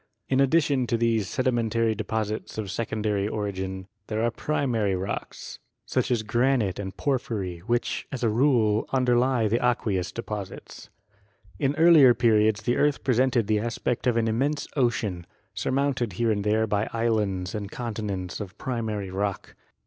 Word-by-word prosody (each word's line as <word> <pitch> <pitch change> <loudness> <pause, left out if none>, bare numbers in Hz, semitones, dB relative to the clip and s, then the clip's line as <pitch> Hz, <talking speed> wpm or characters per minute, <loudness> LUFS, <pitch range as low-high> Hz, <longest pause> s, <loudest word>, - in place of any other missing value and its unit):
In 130 - +2
addition 140 -2 +3
to 115 - +1
these 115 -3 +1
sedimentary 115 -3 +1
deposits 110 0 -3
of 105 -3 -3
sec 115 +2 -3
ondary 105 -2 -1
origin 95 -3 -4 0.2
there 110 +1 -1
are 120 - +2
primary 115 -8 0
rocks, 95 +2 -5 0.3
such - - 0
as 120 -3 +1
granite 120 -3 +1
and 95 -1 -6
porphyry, 110 -10 -2
which, 120 +1 -1
as 125 -2 -4
a 115 - +3
rule, 110 -3 +2
underlie 125 -2 +2
the 115 +4 0
aqueous 105 -7 0
deposits. 105 -4 -7 0.7
In 140 0 +1
earlier 155 -7 +7
periods 110 -2 +3
the 120 +3 +1
earth 145 -1 +1
presented 125 -2 +2
the 105 0 +1
aspect 120 +2 -2
of 120 -2 +2
an 115 -1 +2
immense 140 +6 0
ocean, 115 - 0 0.3
surmounted 130 -5 -1
here 115 +5 +1
and 105 -1 -1
there 110 +2 +2
by 105 0 -1
islands 105 -6 0
and 100 -2 -4
continents 105 -6 -4
of 100 -3 -7
primary 110 -6 -3
rock. 100 +1 -3
115 Hz, 150 wpm, -26 LUFS, 105-125 Hz, 0.7 s, earlier